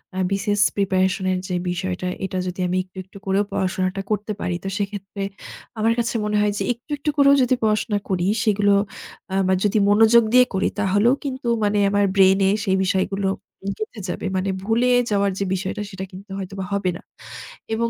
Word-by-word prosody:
আ - - -5
BCS 205 +1 0
preparation 190 0 +1
এর 185 - 0
যে 180 - -2
বিষয়টা 180 +1 -3 0.2
এটা 185 0 -4
যদি 180 +1 -5
আমি 180 +1 0
একটু, 185 0 -21
একটু 190 +2 -15
করেও 195 +1 +2
পড়াশোনাটা 185 +1 -1
করতে 210 +1 -1
পারি, 175 - -1
তো - - -4
সেক্ষেত্রে 200 -1 -5 0.6
আমার 225 +1 +3
কাছে 235 0 -1
মনে 210 0 0
হয় 210 0 +2
যে - - -1
একটু, 240 +6 -19
একটু 300 +1 -2
করেও 280 0 +6
যদি 255 +1 +2
পড়াশোনা 215 -1 +1
করি 180 -1 0 0.2
সেগুলো 205 -2 +3 0.7
আমার 185 0 +2
যদি 210 +1 +2
মনোযোগ 225 +3 +6
দিয়ে 250 0 +7
করি 190 - +1
তাহলেও 205 +4 +3
কিন্তু 260 -3 -4 0.2
মানে 205 0 +1
আমার 205 0 +2
ব্রেইনে 190 0 +5 0.2
সেই 190 -3 +1
বিষয়গুলো 195 +1 0 0.5
গেঁথে 215 0 -6
যাবে। - - -4
মানে 190 +1 -1
ভুলে 230 +4 +2 0.2
যাওয়ার 200 -1 +2
যে 200 - 0
বিষয়টা 190 +2 -3
সেটা 190 -1 -6
কিন্তু 195 +3 -12
হয়তোবা 195 0 -5
হবে 195 -2 0
না। - - -15 0.7
এবং 230 +1 0
200 Hz, 180 wpm, -22 LUFS, 190-215 Hz, 0.7 s, দিয়ে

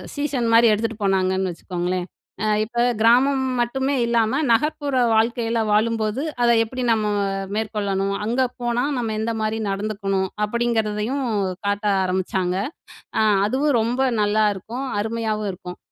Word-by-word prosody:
Season 285 -5 -1
மாரி 230 +1 +7
எடுத்துட்டு 225 +1 -1
போனாங்கன்னு 190 -1 +1
வச்சுக்கோங்களேன். 180 +1 -3 0.4
"அ - - +1 0.2
இப்ப 230 +2 -8 0.2
கிராமம் 260 +4 +4 0.2
மட்டுமே 265 +3 0
இல்லாம, 235 +2 +1
நகர்ப்புற 285 +3 +1 0.2
வாழ்க்கையில 230 +1 +1
வாழும்போது, 220 +2 +1 0.2
அதை 240 0 +5
எப்படி 255 +3 -5
நம்ம 215 -2 +1 0.5
மேற்கொள்ளணும்? 200 -2 -1
அங்க 240 +4 0 0.2
போனா 240 0 0
நம்ம 230 -3 -2
எந்த 225 +1 -1
மாரி 215 0 -1
நடந்துக்கணும்?" 195 -1 -1 0.2
அப்படிங்கிறதையும் 230 +2 -1 0.4
காட்ட 205 +1 -1 0.2
ஆரம்பிச்சாங்க. 185 0 -1 0.6
அ - - +4 0.3
அதுவும் 275 +6 +1
ரொம்ப 240 +4 -1 0.2
நல்லாருக்கும். 210 +4 0 0.2
அருமையாவும் 215 -1 -2
இருக்கும். 180 -1 -9
220 Hz, 120 wpm, -22 LUFS, 205-240 Hz, 0.6 s, மாரி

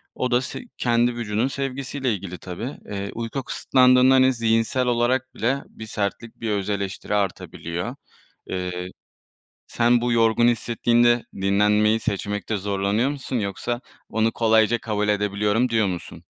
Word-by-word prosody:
O 125 -1 -1
da 120 +1 +3
se - - -6 0.2
kendi 120 0 +2
vücudunun 115 +1 -1
sevgisiyle 135 -2 -2
ilgili 90 -2 -6
tabii. 110 +9 -6
Eee, 100 0 -5
uyku 115 +3 -4
kısıtlandığında, 130 +1 +4
hani, 130 0 +5
zihinsel 115 +2 +1
olarak 125 +2 +1
bile 135 +5 0
bir 110 - -10
sertlik, 105 +2 -3
bir 110 -2 -1
öz 100 0 -1
eleştiri 100 +1 -2
artabiliyor. 95 +2 -3 0.5
Eee, 90 -1 -4 0.8
sen 120 0 +2
bu 120 0 0
yorgun 115 +1 +4
hissettiğinde 120 +1 +2
dinlenmeyi 105 +3 +3
seçmekte 105 +1 -2
zorlanıyor 100 +5 0
musun 135 -3 -4
yoksa 115 +4 -3 0.3
"Onu 110 +1 +1
kolayca 110 0 +3
kabul 105 -1 -2
edebiliyorum." 105 +3 +1
diyor 110 -3 +2
musun? 90 -3 -6
115 Hz, 135 wpm, -23 LUFS, 105-120 Hz, 0.8 s, hani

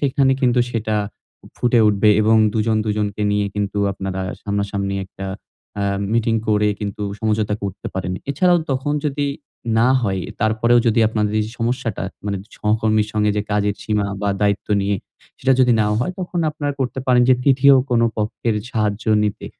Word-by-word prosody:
সেখানে 135 -1 +2
কিন্তু 125 -1 +3
সেটা 110 -2 -1 0.6
ফুটে 120 -1 +2
উঠবে 105 +1 +3
এবং 110 +1 +4 0.2
২ 110 - -1
জন 110 -1 +2
২ 110 - -1
জনকে 105 0 -2
নিয়ে 105 0 +1
কিন্তু 105 0 -2
আপনারা 95 -1 -4 0.2
সামনাসামনি 100 -1 -2
একটা 95 +1 -8 0.5
আ - - 0 0.3
মিটিং 115 0 +1
করে 105 0 +3
কিন্তু 105 0 -4 0.2
সমঝোতা 110 -1 0
করতে 100 -2 -5
পারেন। 95 -1 -3 0.2
এছাড়াও 175 +5 +3
তখন 135 +2 -1
যদি 145 0 -1 0.5
না 120 +2 +4
হয়, 95 -4 -1 0.2
তারপরেও 110 +2 +3
যদি 115 +1 +3
আপনাদের 105 -1 -1
এই 105 - -1
সমস্যাটা, 115 -5 -2 0.2
মানে 100 -1 -1
ছা 105 - -23
সহকর্মীর 110 0 +1
সঙ্গে 105 -1 +2
যে 105 - +1
কাজের 105 -1 +1
সীমা 105 -2 0 0.2
বা, 100 - +1
দায়িত্ব 100 -1 0
নিয়ে, 100 +1 0 0.4
সেটা 135 - +2
যদি 125 -1 +5
নাও 105 0 +1
হয়, 165 +9 -1
তখন 175 -1 -3
আপনারা 145 -1 -3
করতে 130 0 -2
পারেন 125 -1 +4
যে, 130 - +7
৩য় 135 +1 +5 0.2
কোন 120 -1 +3 0.2
পক্ষের 110 +1 -1 0.2
সাহায্য 105 -2 -1 0.2
নিতে। 105 - -3
110 Hz, 170 wpm, -20 LUFS, 105-125 Hz, 0.6 s, যে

